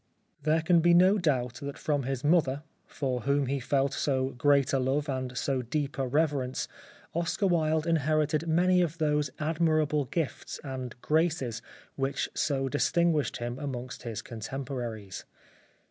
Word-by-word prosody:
There 155 +2 +2
can 170 0 +5
be 170 +1 +5
no 185 +4 +5
doubt 125 -8 0
that 140 0 -5
from 145 -2 0
his 135 0 -3
mother, 145 -3 +2 0.2
for 130 -3 -2
whom 140 +3 +1
he 140 +2 -1
ever 130 - -7
felt 135 +1 +1
so 130 -2 0
great 140 +1 +2
a 135 - +3
love 135 +4 0
and 130 -2 -3
so 135 -1 0
deep 140 +3 -3
a 135 - 0
reverence, 140 -2 0 0.5
Oscar 170 +4 0
Wilde 160 -3 +2
inherited 155 -1 +1
many 180 +3 +4
of 165 -2 -1
those 150 -2 +1
admirable 155 -2 +1
gifts 155 +3 -3
and 130 -4 -6
graces 150 -8 +1 0.4
which 135 0 -1
so 135 -3 0
distinguished 155 +2 +1
him 120 +2 -4
amongst 130 -4 -5
his 115 -3 -5
contemporaries. 115 -4 -5
140 Hz, 150 wpm, -29 LUFS, 130-155 Hz, 0.5 s, can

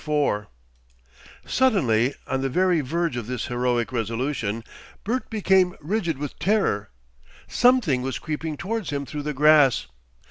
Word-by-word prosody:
4 145 -9 0 1.0
Suddenly, 140 - +2
on 135 - -2
the 135 - -1
very 180 +3 +2
verge 165 +3 -1
of 120 -3 -4
this 125 -2 -3
heroic 120 -1 -1
resolution, 115 -1 -2 0.4
Bert 245 +5 -2
became 190 -4 +2
rigid 170 -2 -2
with 145 0 -6
terror. 190 - +1 0.6
Something 245 - +3
was 130 -1 -3
creeping 155 0 -4
towards 215 +2 -3
him 140 -1 -3
through 150 +2 -5
the 150 +1 -3
grass. 150 -2 +5
145 Hz, 135 wpm, -24 LUFS, 125-185 Hz, 1.0 s, grass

